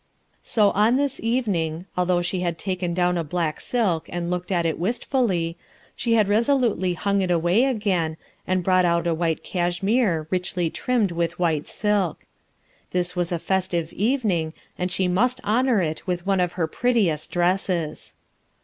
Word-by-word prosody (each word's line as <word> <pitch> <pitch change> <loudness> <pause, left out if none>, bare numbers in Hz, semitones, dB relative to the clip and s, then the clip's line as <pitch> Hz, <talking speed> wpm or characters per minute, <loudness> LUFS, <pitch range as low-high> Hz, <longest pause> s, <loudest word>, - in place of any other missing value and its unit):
So, 210 -3 +2
on 215 +4 +3
this 280 0 0
evening, 190 -9 -1
although 180 -1 +1
she 180 +1 -2
had 175 -2 -2
taken 185 -2 -2
down 180 -1 +2
a - - -1
black 160 -1 -2
silk 200 -10 0
and 175 0 -3
looked 180 +1 -3
at 175 -2 +1
it 160 -1 -1
wistfully, 190 -5 0 0.4
she 235 - 0
had 215 -3 +3
resolutely 220 -4 +2
hung 200 +4 0
it 185 - -1
away 175 +7 +3
again, 190 -11 0 0.3
and 185 -1 +1
brought 185 0 +3
out 170 -1 +2
a 170 - +2
white 165 -1 -1
cashmere 175 0 0
richly 180 -2 -1
trimmed 235 -7 0
with 170 0 -2
white 160 -4 0
silk. 205 -5 -1 0.6
This 180 0 -1
was 175 -1 -1
a 175 - 0
festive 175 -2 -1
evening 205 - 0 0.2
and 180 0 -2
she 185 0 +1
must 245 +8 +1
honor 230 +1 +2
it 160 +1 -3
with 175 -1 -2
one 195 -1 +2
of 180 -1 0
her 175 -3 0
prettiest 190 -5 +1
dresses. 175 -3 -1
180 Hz, 165 wpm, -24 LUFS, 170-210 Hz, 0.6 s, on